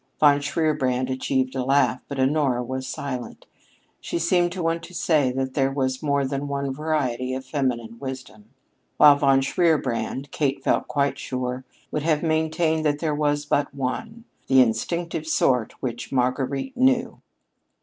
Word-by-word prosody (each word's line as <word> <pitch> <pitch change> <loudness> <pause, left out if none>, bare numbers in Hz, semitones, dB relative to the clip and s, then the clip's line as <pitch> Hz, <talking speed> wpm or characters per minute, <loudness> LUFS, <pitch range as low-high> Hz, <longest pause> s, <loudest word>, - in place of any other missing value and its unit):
Von 145 -1 +6
Shierbrand 140 -4 0
achieved 130 0 -1
a 130 -1 -2
laugh, 135 -1 +2
but 140 -2 -5
Honora 130 -2 +2
was 130 +1 -4
silent. 130 -2 -6 0.5
She - - -3
seemed 175 +1 +2
to 180 -2 -4
want 165 0 0
to 180 - -12
say 150 -6 +2
that 130 0 -2
there 135 -1 +1
was 130 -1 -1
more 140 -2 +1
than 140 +1 -3
one 140 -1 -2
variety 130 -4 -1
of 130 0 -6
feminine 120 -5 -2
wisdom; 130 -6 -8 0.5
while 145 -1 +8
Von 135 -1 +3
Shierbrand, 135 -3 0
Kate 140 -2 -1
felt - - +1
quite 140 -1 0
sure, 125 0 -4 0.3
would 150 - -1
have 155 0 +1
maintained 160 0 +1
that 145 -1 +1
there 155 0 -1
was 145 0 0
but 145 0 0
one 220 - -4 0.2
the 135 -1 +5
instinctive 155 +8 0
sort 125 -7 +2
which 120 -2 -4
"Marguerite 135 - -1
knew." 255 -1 +2
140 Hz, 155 wpm, -24 LUFS, 130-155 Hz, 0.5 s, while